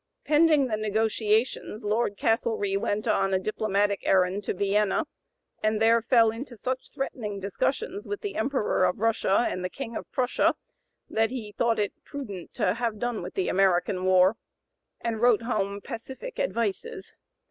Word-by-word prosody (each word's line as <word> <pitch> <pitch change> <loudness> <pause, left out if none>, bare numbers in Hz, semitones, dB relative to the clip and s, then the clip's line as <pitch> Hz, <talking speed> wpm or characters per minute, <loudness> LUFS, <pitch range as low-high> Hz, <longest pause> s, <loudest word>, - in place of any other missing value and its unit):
Pending 305 -2 +4
the 220 -4 -1
negotiations 215 +1 0
Lord 210 -1 0
Castlereagh 215 -3 +1
went 210 +3 -1
on 195 -3 +2
a - - +2
diplomatic 205 0 0
errand 190 +2 +2
to - - -1
Vienna, 205 - +1 0.6
and 215 0 +1
there 230 +1 +4
fell 230 -1 +4
into 240 +1 -8
such 255 +4 -3
threatening 215 -7 -4
discussions 270 - -2
with 410 -1 -4
the 410 - -4
Emperor 220 -4 +1
of 180 - 0
Russia 225 0 +2
and 185 - -3
the 180 - -2
King 235 +1 -7
of - - -6
Prussia, 255 -1 +2 0.5
that 225 0 +1
he 230 -5 -6
thought 230 +2 +1
it 205 -2 0
prudent 205 -11 -7
to 180 - +2
have 230 -1 -2
done 240 0 -2
with 180 +1 -7
the 190 - 0
American 185 -1 +2
(p. - - -5
094) 185 0 +2
war, 185 +4 +5 0.6
and 225 -2 -2
wrote 240 -2 +4
home 200 -4 -1
pacific 265 - -7
advices. 405 - -2
220 Hz, 165 wpm, -27 LUFS, 200-245 Hz, 0.6 s, war